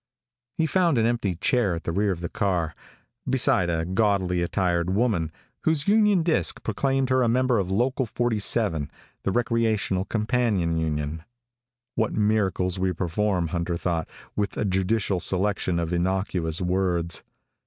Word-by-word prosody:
He 160 - +2
found 170 -3 +2
an 115 - +3
empty 115 -6 0
chair 100 +1 +1
at 85 - -6
the - - -2
rear 100 +3 +1
of 85 -2 -4
the 85 - -2
car, 85 -4 -1 0.6
beside 120 -8 +3
a 80 -1 0
gaudily 95 -2 +1
attired 85 -1 0
woman, 95 -6 +1 0.3
whose 160 -2 +2
union 210 -4 +4
disc 160 -1 0
proclaimed 135 +4 0
her 130 0 +3
a 120 - +3
member 125 -1 +2
of 95 -2 -2
Local 125 +6 0
47, 105 - 0 0.3
the 95 - -1
Recreational 110 -5 0
Companion 105 -6 0
Union. 75 0 -2 0.7
What 110 -1 0
miracles 100 -4 +1
we 95 0 +1
perform, 90 0 -1
Hunter 85 0 -2
thought, 85 -3 -2 0.3
with 100 -1 -2
a - - 0
judicial 95 0 0
selection 95 -1 0
of 85 0 -2
innocuous 90 -2 -1
words! 90 -2 0
95 Hz, 145 wpm, -25 LUFS, 85-115 Hz, 0.7 s, union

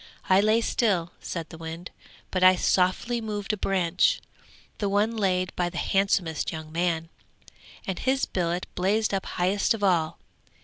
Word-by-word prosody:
I 190 +1 +6
lay 215 +2 +3
still,' 195 -8 +1
said 165 -2 -5
the 160 - -11
wind, 165 +2 -7 0.4
'but 185 -1 0
I 185 0 +8
softly 185 +7 +1
moved 210 -1 -3
a - - +1
branch, 190 - +2 0.6
the 205 - 0
one 210 +3 +1
laid 185 -3 0
by 175 -1 0
the 175 - -8
handsomest 190 -5 +1
young 160 -1 -7
man, 165 -1 -1 0.8
and 190 -2 -3
his 265 +1 +1
billet 175 0 -2
blazed 205 +4 +1
up 195 - -1
highest 195 +5 +1
of 210 - -7
all. 170 -5 +2
185 Hz, 160 wpm, -26 LUFS, 175-205 Hz, 0.8 s, I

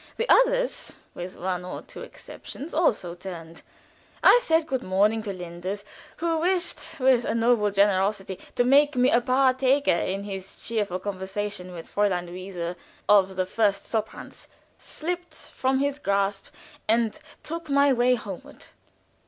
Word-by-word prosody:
The 465 - -1
others, - - +3 0.2
with 180 +1 -7
one 180 0 -2
or 180 - -7
two - - -11
exceptions, 300 +5 -10
also 220 - +1
turned. 170 -2 -9 0.6
I - - +8
said 325 -7 +2
good 260 -3 -2
morning 205 +3 +2
to 210 -2 -4
Linders, 185 +2 -6 0.3
who 330 0 0
wished, 350 -2 -1
with 255 -2 +4
a - - -1
noble 230 -2 +3
generosity, 195 -1 +1 0.2
to 245 - +3
make 285 +4 +4
me 250 +1 +4
a 240 - +4
partaker 260 +2 +3
in 190 +3 -1
his 195 -1 -7
cheerful 210 -5 -2
conversation 190 0 -4
with 170 -2 -9
Fräulein 195 -4 +1
Luise 180 -1 -5 0.3
of 195 -2 +5
the 185 0 0
first 200 0 +1
soprans, 220 -1 -4 0.3
slipped 350 0 -5
from 265 0 -1
his 280 +1 -1
grasp 200 -4 0 0.4
and 225 0 +1 0.2
took 330 0 -5
my 280 0 +4
way 250 +1 +3
homeward. 200 -6 -9
210 Hz, 145 wpm, -26 LUFS, 190-270 Hz, 0.6 s, I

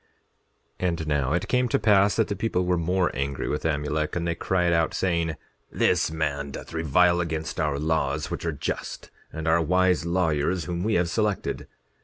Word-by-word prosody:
10:24 90 - +1
And 80 -2 -3
now 70 -3 0
it 90 +4 -1
came 125 0 +1
to - - +2
pass 100 -2 +4
that 110 - +2
the 100 - -2
people 95 -3 -1
were 90 0 +2
more 90 +1 +1
angry 70 +1 -3
with 75 - -2
Amulek, 75 0 -1
and 85 -1 -1
they 85 - +1
cried 90 0 +1
out, 80 -1 +1
saying: 85 -3 0 0.4
This - - +2
man 70 -3 -2
doth 70 - -9
revile 85 +3 +3
against 80 -1 -3
our 75 -2 0
laws 80 +2 -1
which - - -4
are - - 0
just, - - -5 0.2
and 80 0 -5
our 80 +1 +4
wise 90 0 +2
lawyers 85 -1 0
whom 85 0 -3
we 110 +1 +1
have 90 0 +2
selected. 105 -1 -1
85 Hz, 190 wpm, -25 LUFS, 80-90 Hz, 0.4 s, pass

